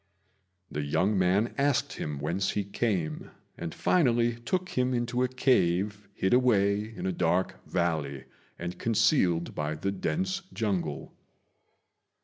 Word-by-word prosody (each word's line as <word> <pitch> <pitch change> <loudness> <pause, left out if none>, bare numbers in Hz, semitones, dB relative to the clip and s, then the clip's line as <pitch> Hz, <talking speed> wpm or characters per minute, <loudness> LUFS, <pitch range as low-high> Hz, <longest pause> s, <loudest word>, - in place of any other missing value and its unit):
The 75 - -2
young 80 +8 +1
man 95 +5 +2
asked 140 0 +1
him 75 -2 -4
whence 85 +7 -1
he 105 - -1
came, 95 -6 -2 0.3
and 85 -1 -5
finally 120 - +2
took 185 +9 -2
him 125 0 0
into 120 +1 -1
a 130 - +3
cave 100 -6 +1
hid 95 - +1
away 105 -4 +3
in - - -5
a 95 - +1
dark 90 +1 0
valley 80 -6 -1 0.3
and 85 +1 -5
concealed 110 - +2
by 75 +1 -2
the 100 +6 -2
dense 185 - -1
jungle. 90 -9 -2
100 Hz, 130 wpm, -28 LUFS, 85-120 Hz, 0.3 s, a